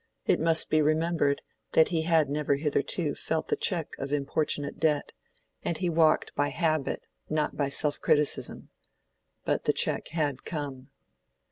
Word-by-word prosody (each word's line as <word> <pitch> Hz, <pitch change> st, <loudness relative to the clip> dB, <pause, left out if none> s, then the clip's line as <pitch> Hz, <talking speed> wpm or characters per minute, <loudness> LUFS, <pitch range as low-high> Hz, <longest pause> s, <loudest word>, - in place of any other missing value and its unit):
It -, -, +3 dB
must 165 Hz, 0 st, +2 dB
be 155 Hz, -, +4 dB
remembered 155 Hz, -1 st, +1 dB, 0.3 s
that 160 Hz, -, +5 dB
he 165 Hz, -2 st, 0 dB
had 160 Hz, -2 st, +3 dB
never 145 Hz, 0 st, 0 dB
hitherto 150 Hz, +1 st, 0 dB
felt 160 Hz, -1 st, -3 dB
the -, -, +2 dB
check 170 Hz, -5 st, 0 dB
of 135 Hz, +1 st, -4 dB
importunate 145 Hz, 0 st, -1 dB
debt, 150 Hz, -2 st, +1 dB, 0.5 s
and 170 Hz, -, -2 dB
he 180 Hz, -2 st, 0 dB
walked 160 Hz, -1 st, +3 dB
by 145 Hz, -, +1 dB
habit, 155 Hz, -4 st, -1 dB, 0.3 s
not 155 Hz, -1 st, 0 dB
by 140 Hz, -2 st, 0 dB
self 145 Hz, +1 st, -1 dB
criticism. 150 Hz, -1 st, +1 dB, 0.8 s
But -, -, 0 dB
the -, -, +3 dB
check -, -, 0 dB
had 150 Hz, -4 st, -2 dB
come. 140 Hz, -5 st, -5 dB
155 Hz, 150 wpm, -28 LUFS, 145-160 Hz, 0.8 s, that